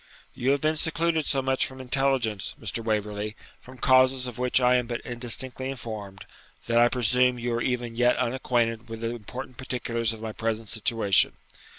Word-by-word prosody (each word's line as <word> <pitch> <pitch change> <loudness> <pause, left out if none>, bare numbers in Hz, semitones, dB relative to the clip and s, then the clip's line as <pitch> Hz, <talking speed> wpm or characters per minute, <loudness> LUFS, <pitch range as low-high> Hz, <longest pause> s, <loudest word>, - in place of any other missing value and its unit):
'You 125 - -1
have 140 0 +2
been 155 +1 +1
secluded 160 0 0
so 135 -2 +1
much 130 0 +2
from 130 0 -11
intelligence, 130 -5 0
Mr. 115 - -3
Waverley, 105 -1 -2 0.2
from 130 +1 -14
causes 130 +1 +4
of 125 -2 -7
which 125 +1 +2
I 125 0 +4
am 125 -1 -2
but 120 -1 -3
indistinctly 125 +2 -1
informed, 110 -7 -7 0.4
that 115 0 +2
I 120 0 +6
presume 125 +1 +2
you 120 0 -2
are 120 - -1
even 120 -2 -2
yet 125 +1 +3
unacquainted 120 -2 0
with 115 0 -7
the 115 - -1
important 125 +3 -8
particulars 115 -3 -1
of 110 - -6
my 110 0 -5
present 110 0 -3
situation. 110 -4 +3
120 Hz, 180 wpm, -26 LUFS, 115-130 Hz, 0.4 s, I